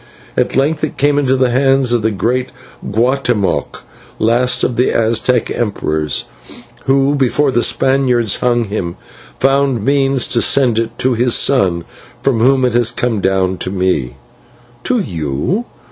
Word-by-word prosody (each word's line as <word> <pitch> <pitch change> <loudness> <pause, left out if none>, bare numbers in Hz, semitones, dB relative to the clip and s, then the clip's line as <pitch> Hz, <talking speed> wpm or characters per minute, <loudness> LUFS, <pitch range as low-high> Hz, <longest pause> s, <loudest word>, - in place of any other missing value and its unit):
At - - 0
length 150 +4 0
it 155 - -3
came 145 +1 +2
into 135 -2 +1
the 130 -1 +1
hands 135 -1 +2
of 120 - +1
the 110 - +1
great 120 +5 -1 0.3
Guatemoc, 115 - -1 0.3
last 120 +3 +1
of 125 - 0
the 125 - +1
Aztec 115 +2 0
emperors, 80 - -2 0.6
who, 135 +1 +2
before 140 +1 +1
the 120 - +1
Spaniards 120 -3 +1
hung 120 -1 +1
him, 100 -5 -4 0.4
found 135 -4 +1
means 135 -2 +2
to 120 -4 +1
send 125 -5 +2
it 115 0 -4
to 130 0 +1
his 120 +1 +2
son, 95 -11 +2 0.4
from 135 -5 +1
whom 130 +2 +3
it 125 - 0
has 120 -1 +3
come 120 -3 -2
down 95 -1 0
to - - -3
me." 90 -10 -1 0.7
"To 255 - +1
you? 85 - -2
120 Hz, 150 wpm, -15 LUFS, 110-135 Hz, 0.7 s, whom